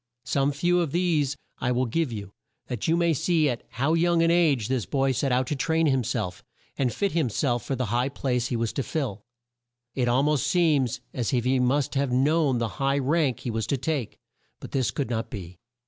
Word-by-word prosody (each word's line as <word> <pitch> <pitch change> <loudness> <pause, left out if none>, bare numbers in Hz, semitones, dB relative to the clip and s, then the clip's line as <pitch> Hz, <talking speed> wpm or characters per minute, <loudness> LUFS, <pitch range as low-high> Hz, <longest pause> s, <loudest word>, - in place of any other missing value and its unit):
Some 135 +3 +1
few 175 +5 +1
of 165 -5 -1
these 160 -6 +1 0.2
I 125 - 0
will 125 +1 +1
give 145 +3 -1
you, 100 -3 -7 0.3
that 125 -5 -4
you 165 +1 +3
may 170 -1 +3
see 160 +1 +2
at 120 -3 -2
how 140 +5 0
young 170 0 +3
an 165 - +3
age 150 -10 +3
this 130 -4 -1
boy 135 -1 +1
set 135 +1 0
out 125 +1 +2
to 145 - -2
train 160 +4 +1
him 135 -4 +2
self, 90 -4 -3 0.3
and 130 -3 0
fit 200 - -1
him 160 -6 +1
self 120 0 0
for 135 - -2
the 125 0 -1
high 125 +3 +1
place 125 -3 -1
he 125 - -2
was 115 -1 -1
to - - -1
fill. 130 -8 -3 0.7
It 125 -2 0
al 125 +3 +3
most 150 -3 +1
seems 150 -9 +2
as 120 -3 -1
if 120 - +1
he 130 0 +2
must 135 +3 +1
have 140 -2 0
known 140 +1 +2
the 115 -1 0
high 135 +1 +2
rank 140 -2 +1
he 120 - -3
was 110 0 -2
to 140 - 0
take; 135 -3 -3 0.4
but - - -9
this 130 -5 +1
could 125 +3 -3
not 115 -1 -2
be. 90 -5 -8
135 Hz, 225 wpm, -26 LUFS, 120-155 Hz, 0.7 s, you